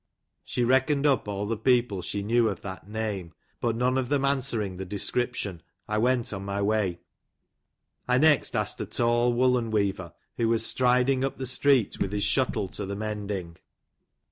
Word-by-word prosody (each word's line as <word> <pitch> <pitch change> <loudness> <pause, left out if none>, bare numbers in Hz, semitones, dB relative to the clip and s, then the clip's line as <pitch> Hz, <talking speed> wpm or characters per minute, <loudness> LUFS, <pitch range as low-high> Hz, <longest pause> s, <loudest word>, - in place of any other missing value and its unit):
She 125 - -2
reckoned 130 +4 +2
up 140 -6 +2
all 100 0 -3
the 115 +2 -1
peo 120 +2 +3
ple 100 -6 -6
she 100 +3 -4
knew 115 +2 +3
of 100 - -5
that 95 0 -8
name, 105 -6 -4 0.2
but 115 -2 0
none 125 +2 +1
of 125 -2 -3
them 140 -1 +1
answering 120 -9 -1
the 95 - -4
description, 100 -1 -2 0.3
I 105 0 0
went 120 -1 +1
on 95 -1 -5
my 100 0 -3
way. 100 -4 0 1.1
I 125 0 +3
next 150 0 +3
asked - - -1
a - - -4
tall 120 +1 +2
woollen 125 -1 +2
weaver, 100 -5 -1 0.2
who 115 -1 +1
was 115 -1 +2
striding 125 +1 +2
up 135 - -2
the 130 - -4
street 130 -2 +2
with 100 - -1
his 105 -1 0
shuttle 105 0 +1
to 100 - -5
the 100 - -4
mending. 100 -5 -4
115 Hz, 180 wpm, -27 LUFS, 100-125 Hz, 1.1 s, peo